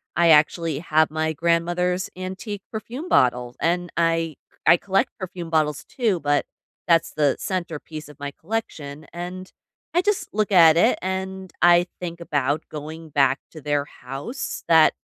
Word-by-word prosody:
I 170 -1 +4
actually 155 0 +4
have 155 -1 +2
my 160 0 -1
grandmother's 175 +3 0
antique 190 +2 -6
perfume 235 - -6
bottle, 125 - +2
and 175 +1 0
I 165 -2 +1 0.3
I 170 +2 +7
collect 195 +2 0
perfume 180 -2 -6
bottles 155 -3 +1
too, 220 -8 0
but 145 -1 +1 0.4
that's 165 -1 +3
the 145 -3 +2
centerpiece 160 -4 -5
of 150 - -15
my 145 0 -4
collection, 155 -6 -5
and 180 +2 -6 0.4
I 350 - +4
just 415 +1 0
look 215 0 0
at 165 -4 +7
it - - +4
and 190 0 -4
I 175 0 +6
think 170 -1 -5
about 145 -1 0
going 155 +2 -8
back 135 -2 +3
to 155 - -10
their 145 0 0
house 135 - -6
that 160 -1 +6
165 Hz, 150 wpm, -23 LUFS, 150-185 Hz, 0.4 s, I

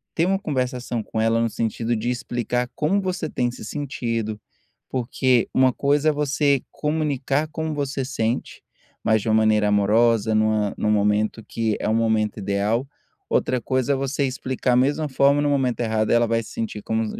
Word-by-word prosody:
ter 165 - +2
uma 195 +1 +1
conversação 125 - -2
com 110 - -4
ela 115 +1 +2
no 115 - +1
sentido 115 +1 -1
de 115 +2 -2
explicar 120 0 -2
como 190 +7 +1
você 185 -4 -3
tem 120 -3 -1
se 120 - -9
sentido, 115 -6 -3 0.5
porque 130 -1 +1
uma 130 0 +4
coisa 145 +3 +2
é - - +4
você 145 -1 +1
comunicar 150 -1 -1
como 160 -1 -3
você 140 -2 -2
sente, 120 -3 -3 0.4
mas 110 -1 +3
de - - -6
uma 110 - +4
maneira 110 -1 +3
amorosa, 110 +2 +3
numa 110 -1 +1
num 105 - +1
momento 105 +2 +1
que 110 -2 -1
é - - -2
o 110 - +2
momento 110 -1 +1
ideal, 105 +6 0 0.4
outra 125 -1 +1
coisa 130 +2 0
é - - +1
você 135 +1 -1
explicar 130 -1 -1
a - - +4
mesma 145 +4 +1
forma 140 +2 +3
e - - 0
no 145 - +2
momento 135 -4 0
errado, 110 -2 0
ela 120 0 +4
vai 115 0 +1
se - - -11
sentir 110 -2 -4
como 110 0 -1
120 Hz, 185 wpm, -23 LUFS, 110-140 Hz, 0.5 s, uma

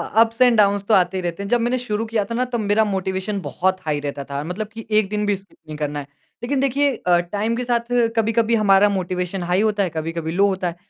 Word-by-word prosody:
Ups 225 +2 +3
and 245 -2 +6
downs 200 -1 +3
तो 225 - +3
आते 185 -1 +3
ही - - -2
रहते 175 +2 -4
हैं। 200 - -6
जब 240 - +3
मैंने 240 +2 +1
शुरू 225 -3 -3
किया 220 -2 0
था 230 - -6
ना 250 +2 +1
तब 235 - -1
मेरा 210 +1 +2
मोटिवेशन 190 0 -2
बहुत 185 +1 -1
हाई 150 -2 0
रहता 145 -1 -5
था। 140 +1 -5
मतलब 180 +7 -4
कि 225 0 -8
एक 195 - -2
दिन 210 0 -1
भी 205 -1 +1
स्किप 195 +1 -16
नहीं 155 -1 -7
करना 150 -1 -3
है। 140 - -8 0.4
लेकिन 270 +3 0
देखिए 275 +1 +1
अ, 180 -5 +2
टाइम 205 +6 -2
के 250 - -2
साथ 240 -1 -1 0.2
कभी-कभी 225 +1 +2
हमारा 205 -1 +4
मोटिवेशन 180 -1 -2
हाई 180 +3 +1
होता 210 -2 +1
है, 185 - -1
कभी-कभी 160 0 -4
लो 195 +4 +3
होता 190 -2 -1
है। 170 - -4
200 Hz, 255 wpm, -21 LUFS, 180-225 Hz, 0.4 s, and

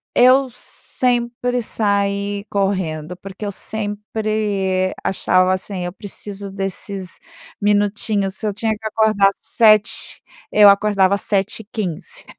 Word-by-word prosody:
Eu 260 +1 +5
sempre 245 0 -1
saí 200 -1 0
correndo. 180 -5 -1
Porque 195 +3 -9
eu 200 - -2
sempre 205 -2 -2
achava, 185 -1 +2
assim: 185 -1 -4
"Eu 175 - -5
preciso 200 -1 -7
desses 195 -1 -4 0.4
minutinhos". 205 -1 +1
Se 215 - -6
eu 210 - 0
tinha 220 +2 -1
que 220 +1 -14
acordar 215 -2 +3
7h, 215 -2 +2 0.3
eu 210 -1 +7
acordava 200 -1 +3
7h15. 200 -2 -3
205 Hz, 105 wpm, -19 LUFS, 195-215 Hz, 0.4 s, eu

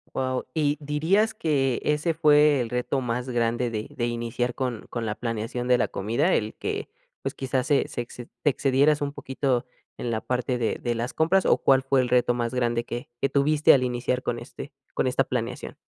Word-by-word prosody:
Wao. 130 -1 -1
¿Y 150 -2 +1
dirías 160 +10 +1
que 135 - 0
ese 150 +3 +1
fue 150 -2 +5
el 120 -2 -3
reto 125 +2 -1
más 125 0 -3
grande 120 0 0
de 110 -1 -4
de 120 - -1
iniciar 120 +1 -2
con 125 -4 -3
con 120 -2 -3
la 105 - -1
planeación 115 +1 -3
de 125 -1 +5
la - - +1
comida? 120 - 0
El 110 0 -1
que, - - -4 0.3
pues, - - -3
quizás 130 -1 -1
se 145 -2 +2
sex 120 -1 -6
se 120 - -8 0.2
te 145 - +4
excedieras 140 +2 +2
un 140 0 -2
poquito 135 -3 -1 0.3
en 120 - -3
la 110 -1 -1
parte 125 +1 -1
de 115 -2 -1
de 120 -1 0
las 120 +2 -3
compras?, 180 +4 +3
¿o - - +4
cuál 135 -1 +4
fue 135 0 +2
el 125 - 0
reto 120 0 +3
más 120 0 -2
grande 120 -1 0
que 120 +1 -6
que 140 - +2
tuviste 150 +2 +4
al 130 - +2
iniciar 125 0 -1
con 120 - -2
este 120 +4 -9 0.2
con - - +1
esta 130 +1 +2
planeación? 125 -1 -4
125 Hz, 210 wpm, -25 LUFS, 120-140 Hz, 0.3 s, fue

